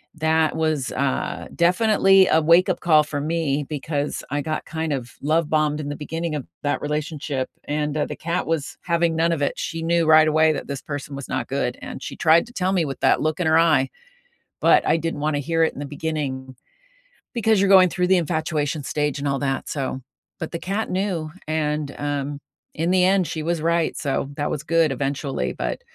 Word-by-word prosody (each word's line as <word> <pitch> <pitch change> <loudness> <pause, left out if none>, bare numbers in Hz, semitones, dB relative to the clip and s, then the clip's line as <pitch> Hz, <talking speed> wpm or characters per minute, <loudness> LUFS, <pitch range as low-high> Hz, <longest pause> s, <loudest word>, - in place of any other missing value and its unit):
that 160 0 +1
was, 155 -4 0
uh, 65 - -2
definitely 195 +1 +4
a 160 - +4
wakeup 170 +3 +4
call 155 -3 +4
for 145 -1 -4
me 150 -2 -1
because 145 0 -3
I 145 0 0
got 155 +1 -3
kind 160 -1 -3
of 125 -4 -3
love 155 +2 +1
bombed 155 -1 +1
in 145 -1 -4
the 145 - -4
beginning 160 +2 -4
of 140 - -5 0.2
that 145 - 0
relationship, 150 -3 -3 0.2
and, 150 0 -2
uh, 150 - +1
the - - -5
cat 170 +1 -2
was 160 -3 -2
having 170 -1 +1
none 165 +1 +2
of 155 -3 -1
it, - - -1
she 165 0 -4
knew 170 -1 +2
right 155 0 +7
away 155 0 +4
that 140 - -5
this 140 -1 -5
person 145 -1 -6
was 140 - -7
not 130 - -2
good, 130 -2 -2
and - - -7
she - - -6
tried 165 +7 +4
to 240 - -15
tell 190 -3 0
me 170 -4 +2
with 135 - -5
that - - +3
look 155 +2 -1
in 175 - 0
her 160 +1 +5
eye, 150 -6 +3 0.7
but - - +5
I - - +4
didn't 165 -2 -3
wanna 150 -1 0
hear 165 +3 0
it - - -1
in - - -10
the - - -4
beginning 140 -3 -4 0.8
because 220 -3 +2
you're 195 0 +2
going 185 -2 +7
through 180 +1 0
the 190 0 +4
infatuation 155 -3 -1
stage 150 0 -1
and 140 - -2
all 140 -1 0
that 135 -1 -2
so, 135 -2 -3 0.4
but, 160 - -5
the 170 - -4
cat 200 +4 -2
knew, 180 -5 -2 0.2
and, 150 -2 -1
um, 145 0 -3 0.4
in 165 +3 0
the 185 -1 +4
end, 190 -1 +3
she 160 - -4
was 170 -1 -1
right, 170 -1 +1
so 140 -1 -2
that 145 - -1
was 150 - -3
good 165 -2 +2
eventually 135 +1 -2
but, - - -3
155 Hz, 210 wpm, -23 LUFS, 145-170 Hz, 0.8 s, right